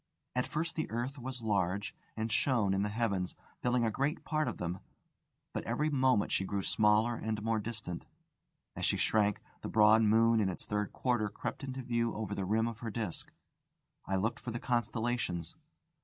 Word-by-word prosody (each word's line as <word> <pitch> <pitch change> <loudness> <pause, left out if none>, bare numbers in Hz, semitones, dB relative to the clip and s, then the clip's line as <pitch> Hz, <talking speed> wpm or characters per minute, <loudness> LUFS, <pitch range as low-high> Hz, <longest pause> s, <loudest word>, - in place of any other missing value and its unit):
At 125 - +1
first 165 +2 -2
the 155 - -2
earth 125 +5 -3
was 125 -1 -5
large, 100 -1 0 0.2
and 110 +1 -1
shone 110 -6 +2
in 95 - +1
the 105 - 0
heavens, 105 -5 -1 0.3
filling 125 -1 +2
a 110 - +1
great 140 - -1
part 155 -2 0
of 120 - -3
them; 90 +1 -3 0.7
but - - -2
every 150 +1 0
moment 130 -6 +3
she - - +2
grew 100 0 -2
smaller 105 +4 +3
and 110 -1 -2
more 115 0 +1
distant. 105 -5 -5 0.7
As - - -5
she - - +2
shrank, 105 -2 +2 0.2
the - - -4
broad 110 0 +6
moon 115 +1 +5
in 100 -3 +2
its 90 - -5
third 105 -1 -1
quarter 120 -5 0
crept - - -5
into 135 -1 -4
view 115 -1 0
over 105 -2 -3
the 100 -2 -2
rim 110 +4 +2
of 115 -2 -5
her 115 - -4
disc. 105 -5 -4 0.8
I 95 - +1
looked 110 +5 0
for - - -6
the 120 0 -3
constellations. 120 -8 -1
110 Hz, 185 wpm, -33 LUFS, 105-120 Hz, 0.8 s, broad